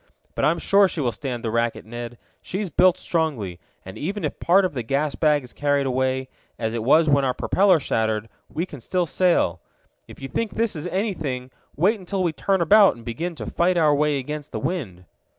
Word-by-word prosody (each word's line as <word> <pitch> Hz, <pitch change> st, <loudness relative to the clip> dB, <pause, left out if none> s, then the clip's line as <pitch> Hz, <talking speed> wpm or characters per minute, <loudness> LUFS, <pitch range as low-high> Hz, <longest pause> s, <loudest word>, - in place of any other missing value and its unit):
But -, -, 0 dB
I'm 160 Hz, +4 st, +2 dB
sure 200 Hz, +4 st, +4 dB
she 175 Hz, -, -5 dB
will 125 Hz, -5 st, +1 dB
stand 120 Hz, +1 st, -5 dB
the 115 Hz, -, -2 dB
racket, 115 Hz, 0 st, -1 dB
Ned. 120 Hz, +1 st, -7 dB, 0.2 s
She's 190 Hz, -1 st, -4 dB
built 185 Hz, +4 st, +4 dB
strongly, 145 Hz, -, -2 dB, 0.3 s
and 95 Hz, -, -9 dB
even 200 Hz, +6 st, -3 dB
if -, -, -3 dB
part 190 Hz, +3 st, +4 dB
of 185 Hz, -, -2 dB
the 125 Hz, -, -3 dB
gas 140 Hz, +5 st, -1 dB
bag 150 Hz, -3 st, +2 dB
is 125 Hz, -, -12 dB
carried 145 Hz, -1 st, +1 dB
away, 130 Hz, 0 st, 0 dB, 0.3 s
as 110 Hz, -1 st, -2 dB
it 115 Hz, -, -2 dB
was 155 Hz, +6 st, +4 dB
when 140 Hz, -1 st, +3 dB
our 130 Hz, -1 st, 0 dB
propeller 190 Hz, -4 st, +3 dB
shattered, 110 Hz, -4 st, -1 dB, 0.2 s
we 165 Hz, -, -2 dB
can 145 Hz, -8 st, -11 dB
still 180 Hz, +8 st, 0 dB
sail. 165 Hz, -, +1 dB, 0.5 s
If -, -, -13 dB
you 135 Hz, -, -6 dB
think 210 Hz, -, -3 dB
this 225 Hz, -3 st, 0 dB
is 155 Hz, +2 st, -5 dB
anything, 160 Hz, -, -3 dB, 0.2 s
wait 200 Hz, +8 st, +2 dB
until 190 Hz, +1 st, -2 dB
we 170 Hz, -3 st, 0 dB
turn 190 Hz, +3 st, 0 dB
about 200 Hz, +4 st, +6 dB
and 115 Hz, -1 st, -14 dB
begin 165 Hz, +9 st, -4 dB
to -, -, -7 dB
fight 175 Hz, +1 st, +1 dB
our 155 Hz, -3 st, +4 dB
way 150 Hz, 0 st, +2 dB
against 150 Hz, +2 st, -6 dB
the -, -, -4 dB
wind." 105 Hz, -, -4 dB
150 Hz, 210 wpm, -23 LUFS, 125-180 Hz, 0.5 s, about